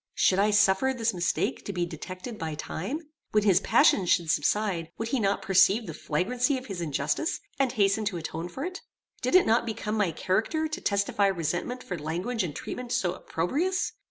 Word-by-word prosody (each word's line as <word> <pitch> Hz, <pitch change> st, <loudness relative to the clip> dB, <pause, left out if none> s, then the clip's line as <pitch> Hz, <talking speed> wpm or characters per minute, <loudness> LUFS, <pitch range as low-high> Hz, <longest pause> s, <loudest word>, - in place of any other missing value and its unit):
Should 190 Hz, -, +3 dB
I 205 Hz, +2 st, +4 dB
suffer 205 Hz, +5 st, +3 dB
this 230 Hz, -2 st, +1 dB
mistake 175 Hz, 0 st, -1 dB
to -, -, -3 dB
be 175 Hz, -2 st, -1 dB
detected 185 Hz, +7 st, -7 dB
by 160 Hz, -2 st, -3 dB
time? 195 Hz, -, -4 dB, 0.3 s
When 210 Hz, -1 st, +4 dB
his 195 Hz, -4 st, +5 dB
passion 190 Hz, -1 st, +4 dB
should 170 Hz, -2 st, +3 dB
subside, 170 Hz, +1 st, 0 dB
would 225 Hz, 0 st, -3 dB
he 265 Hz, -, +1 dB
not 200 Hz, -2 st, 0 dB
perceive 195 Hz, +4 st, +4 dB
the -, -, -6 dB
flagrancy 245 Hz, -, 0 dB
of 255 Hz, -, -8 dB
his 195 Hz, -7 st, -5 dB
injustice, 170 Hz, -, -1 dB, 0.2 s
and 270 Hz, -2 st, +2 dB
hasten 205 Hz, -1 st, +2 dB
to 200 Hz, -4 st, -1 dB
atone 165 Hz, +1 st, -5 dB
for 265 Hz, -, -5 dB
it? 365 Hz, +1 st, -6 dB, 0.4 s
Did -, -, +1 dB
it 370 Hz, -, +7 dB
not 225 Hz, +2 st, +3 dB
become 215 Hz, -2 st, -4 dB
my 205 Hz, -4 st, +2 dB
character 220 Hz, -, 0 dB
to 315 Hz, +4 st, -5 dB
testify 200 Hz, 0 st, +1 dB
resentment 180 Hz, +8 st, -2 dB
for 180 Hz, -3 st, -5 dB
language 180 Hz, +9 st, -2 dB
and 160 Hz, -5 st, -4 dB
treatment 250 Hz, -1 st, -6 dB
so 180 Hz, -6 st, +1 dB
opprobrious? 295 Hz, -, -1 dB
200 Hz, 190 wpm, -27 LUFS, 175-245 Hz, 0.4 s, it